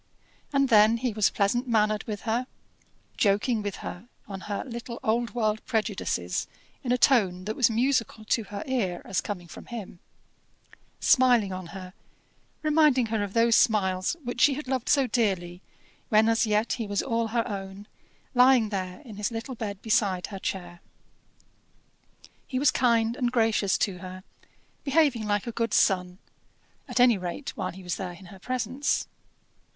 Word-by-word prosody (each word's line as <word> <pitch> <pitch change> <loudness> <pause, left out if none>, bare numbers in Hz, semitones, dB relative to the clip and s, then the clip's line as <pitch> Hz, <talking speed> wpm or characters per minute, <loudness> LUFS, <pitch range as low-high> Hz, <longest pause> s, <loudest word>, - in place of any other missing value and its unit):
And 275 -2 +2
then 220 0 +6
he 240 -1 -2
was 215 -1 +3
pleasant 240 +6 0
mannered 215 -2 +1
with 210 -2 -5
her; 240 +2 -1 0.7
joking 210 +3 +2
with 205 -2 -4
her 180 +6 -7 0.2
on 195 -2 -7
her 205 - -2
little 235 -1 -7
old 235 +1 0
world 215 -2 0
prejudices 205 - -1 0.4
in 245 - -1
a 250 - +3
tone 190 -9 +3
that 215 +1 -3
was 245 -4 +4
musical 230 -2 0
to 220 0 0
her 200 0 -6
ear 215 -10 -2
as 190 - -1
coming 180 -4 -6
from 160 - -11
him; 210 -7 -8 1.0
smiling 245 -7 +4
on 185 -1 -6
her, 185 0 -9 0.7
reminding 300 -5 +4
her 220 - +1
of 200 -1 -5
those 230 0 +4
smiles 190 - +2
which 245 0 -4
she 280 - +5
had 300 -1 -6
loved 260 -1 -2
so 275 -2 +4
dearly 190 -7 -1 0.5
when 215 +1 +4
as 225 0 +2
yet 215 +2 +1
he 230 -4 -3
was 200 0 -1
all 230 -2 0
her 230 +1 -1
own, 195 0 -6 0.5
lying 250 -3 +5
there 185 -3 -4
in 225 -8 -11
his 210 0 -1
little 230 +3 -5
bed 205 -4 -6
beside 200 -5 +1
her 195 -2 -7
chair. 175 -3 -5 1.7
He 255 - -3
was 275 +1 +4
kind 230 -2 +2
and 245 -3 -1
gracious 225 -5 +2
to 190 -4 -1
her, 185 0 -9 0.6
behaving 275 -7 +2
like 205 -1 0
a 235 - -4
good 230 -1 -1
son, 180 -1 +2 0.7
at - - -2
any 245 -4 +5
rate 180 +10 -5
while - - -3
he 190 +1 -11
was 180 -1 -3
there 185 -2 -5
in 190 +2 -14
her 190 - -13
presence. 255 +5 -1
220 Hz, 165 wpm, -27 LUFS, 195-245 Hz, 1.7 s, then